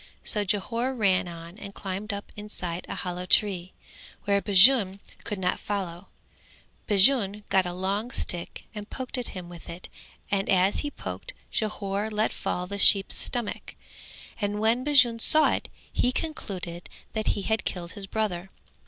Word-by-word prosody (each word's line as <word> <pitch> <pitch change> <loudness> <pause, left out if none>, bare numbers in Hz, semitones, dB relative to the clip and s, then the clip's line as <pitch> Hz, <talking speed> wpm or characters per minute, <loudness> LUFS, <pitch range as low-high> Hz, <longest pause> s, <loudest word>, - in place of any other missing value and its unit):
So 210 - 0
Jhore 230 +6 -1
ran 195 -3 +2
on 170 +2 -10
and 200 -1 -9
climbed 195 +2 -5
up 200 0 -7
inside 180 -5 -5
a - - -4
hollow 180 0 -5
tree, 185 -3 +2 0.5
where 200 0 +2
Bajun 200 0 +7 0.2
could 210 - -4
not 180 -1 -1
follow, 185 -4 -4 0.8
Bajun 205 0 +4
got 190 -2 +3
a - - -3
long 195 +5 -2
stick 175 -8 -1
and 210 -1 -8
poked 260 -1 -4
at 245 - -4
him 180 -1 -7
with 175 -1 -12
it 170 +2 -9 0.4
and 195 -1 0
as 190 +1 +3
he 290 - -2
poked, - - -8 0.2
Jhore 210 -1 -2
let 215 0 0
fall 180 - -3
the 200 +2 -5
sheep's 195 0 +5
stomach, 240 -4 -3 0.6
and 205 -1 -2
when 225 +4 +2
Bajun 255 -5 +4
saw 310 +6 +6
it - - -3 0.2
he 250 - +1
concluded 190 - -5 0.2
that 220 -1 -3
he 200 - -3
had 220 +1 0
killed 175 -2 -5
his 200 -3 -7
brother. 190 -4 -2
200 Hz, 160 wpm, -26 LUFS, 185-220 Hz, 0.8 s, Bajun